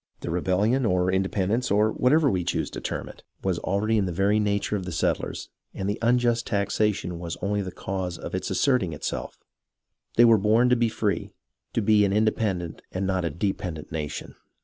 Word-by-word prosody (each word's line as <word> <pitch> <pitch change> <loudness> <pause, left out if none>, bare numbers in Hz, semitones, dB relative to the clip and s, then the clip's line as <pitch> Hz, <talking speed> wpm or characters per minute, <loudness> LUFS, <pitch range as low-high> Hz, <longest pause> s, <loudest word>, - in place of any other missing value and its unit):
The 85 - -4
rebellion, 95 +9 +1
or 90 -4 +2
independence, 95 +5 0
or 105 +2 +3
whatever 145 +7 +3
we 95 -8 +1
choose 85 - -1
to - - -6
term - - -4
it, - - -12 0.2
was 95 -3 0
already 105 +4 +1
in 95 - 0
the - - -2
very 100 +5 +2
nature 105 0 0
of 95 -3 -3
the 90 - -5
settlers, 80 - -1 0.3
and 95 - -3
the 105 +2 -2
unjust 120 0 +2
taxation 100 -3 0
was 85 -1 -5
only 100 +1 0
the 95 -2 -5
cause 90 -1 -4
of - - -7
its - - -2
asserting 125 - +1
itself. 75 - -4 0.8
They 120 - +7
were 115 -2 +6
born 110 +5 +4
to 125 - +5
be 120 -1 +2
free, 105 -2 -2 0.4
to 115 - 0
be 105 0 +5
an 100 -1 +2
inde 110 +1 +3
pendent 90 -6 -2
and 95 +1 -2
not 95 -2 0
a - - 0
dependent 85 -1 -3
nation. 75 -2 -5
100 Hz, 195 wpm, -26 LUFS, 90-110 Hz, 0.8 s, They